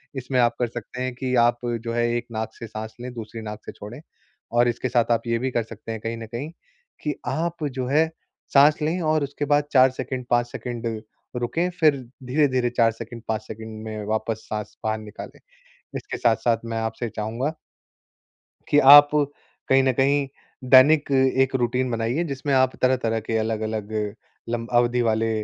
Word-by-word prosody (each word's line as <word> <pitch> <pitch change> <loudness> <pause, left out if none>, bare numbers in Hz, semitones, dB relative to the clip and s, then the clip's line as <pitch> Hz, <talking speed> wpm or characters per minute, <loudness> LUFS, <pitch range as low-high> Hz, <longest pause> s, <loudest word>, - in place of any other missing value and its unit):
इसमें 130 0 -1
आप 120 -1 +3
कर 120 - +1
सकते 120 +2 -7
हैं 130 0 -2
कि 125 0 -2
आप 120 0 +1 0.2
जो 115 0 -3
है 120 0 +1
एक 120 - -4
नाक 110 0 -4
से 115 - -9
साँस 110 0 -7
लें, 125 0 -6
दूसरी 115 -1 -7
नाक 105 0 -7
से - - -6
छोड़ें 110 +7 -10 0.5
और 120 +1 +3
इसके 120 +2 -1
साथ 120 -1 +2
आप 115 - +3
ये 115 0 +1
भी 130 +2 -1
कर 120 -2 0
सकते 115 0 -9
हैं 110 - -4
कहीं 115 +1 -4
न 115 - -7
कहीं 125 +7 -5 0.5
कि 150 - 0
आप 165 +5 -2
जो 130 - -1
है 155 +4 +3 0.5
साँस 150 +2 +6
लें 160 +4 0
और 155 -2 +1
उसके 145 +1 -3
बाद 145 0 +3
4 130 0 +7
सेकंड, 130 0 -5
5 120 0 +2
सेकंड 120 -1 -5 0.5
रुकें, 165 +9 -1
फिर 155 -4 +5 0.3
धीरे-धीरे 130 -3 +2
4 115 -1 +3
सेकंड 115 +1 -9
5 110 -1 -1
सेकंड 110 0 -8
में 110 -1 -5
वापस 110 0 -2
साँस 105 -1 -5
बाहर 110 0 0
निकालें। 105 0 -10 0.6
इसके - - -6
साथ-साथ 115 0 +2
मैं 115 0 -3
आपसे 115 +1 -3
चाहूँगा 115 +9 -3 1.2
कि 145 - +5
आप 145 +1 +9 0.6
कहीं 135 0 +5
न 130 - +3
कहीं 140 +2 +2 0.4
दैनिक 140 +3 +6
एक 130 0 +3
अ, - - +4
रूटीन 125 +1 0
बनाइए, 115 +8 -1
जिसमें 140 -2 -3
आप 130 -1 +3
तरह-तरह 120 -3 +2
के 110 +1 -2
अलग-अलग 110 -1 -2 0.6
लंब 115 0 -3
अवधि 120 0 +3
वाले 115 -1 +1
120 Hz, 185 wpm, -24 LUFS, 115-135 Hz, 1.2 s, आप